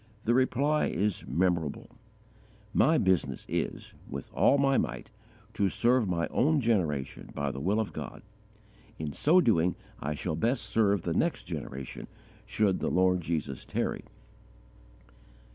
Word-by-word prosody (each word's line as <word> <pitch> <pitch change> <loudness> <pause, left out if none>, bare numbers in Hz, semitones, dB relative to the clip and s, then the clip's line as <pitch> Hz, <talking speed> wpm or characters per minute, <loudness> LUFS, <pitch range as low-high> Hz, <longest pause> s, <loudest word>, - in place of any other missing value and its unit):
_ - - -29
The 120 - +2
reply 135 +4 +2
is 100 +2 -1
memorable: 85 0 0 0.8
"My 160 +1 +4
business 95 - +1
is, - - -3 0.2
with - - -7
all 140 - +4
my 135 -1 +3
might, - - -2 0.4
to 100 -3 +1
serve 120 +2 +2
my 85 -2 0
own 150 +4 +3
generation 90 - -1
by 70 -1 -1
the 70 - -6
will 100 +9 +1
of 110 - -2
God: - - -7 0.7
in 75 -2 -4
so 165 - +4
doing 90 - +2 0.2
I 75 +1 -3
shall 80 +2 -3
best 115 - 0
serve 100 -4 +2
the - - -1
next - - 0
generation, 65 0 -6 0.4
should 100 -4 +1
the - - -1
Lord 90 0 +3
Jesus 75 -5 -3
tarry." - - -2
95 Hz, 145 wpm, -29 LUFS, 80-120 Hz, 0.8 s, My